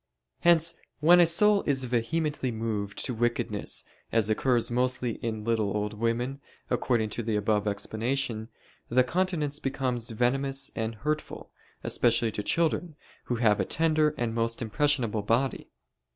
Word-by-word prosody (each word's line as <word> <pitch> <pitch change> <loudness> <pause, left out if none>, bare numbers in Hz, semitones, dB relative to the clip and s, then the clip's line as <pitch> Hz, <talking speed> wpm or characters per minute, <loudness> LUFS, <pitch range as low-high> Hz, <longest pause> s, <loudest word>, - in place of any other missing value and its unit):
Hence 170 -1 +4
then - - -30 0.2
when 175 +3 +7
a 175 - +6
soul 205 +4 +5
is 135 -2 +2
vehemently 130 +3 -1
moved 110 -3 -3
to 125 - -1
wickedness, 120 +1 0 0.3
as 110 -2 +2
occurs 120 +1 +1
mostly 125 -1 0
in 110 -2 -4
little 110 -3 0
old 105 0 -2
women, 120 +5 -2 0.3
according 110 -4 0
to 120 - -3
the 110 -1 -2
above 105 0 0
explanation, 110 +2 -2 0.4
the 125 +2 +4
countenance 155 -1 -1
becomes 125 -3 -2
venomous 135 +4 0
and 110 0 -3
hurtful, 150 +8 -4 0.3
especially 115 -1 +2
to 105 - -3
children, 165 +5 0 0.3
who 125 - -1
have 110 -3 +2
a - - +2
tender 155 -1 +2
and 120 -2 -1
most 115 0 -1
impressionable 120 -2 0
body. 115 +6 0
120 Hz, 145 wpm, -28 LUFS, 110-145 Hz, 0.4 s, when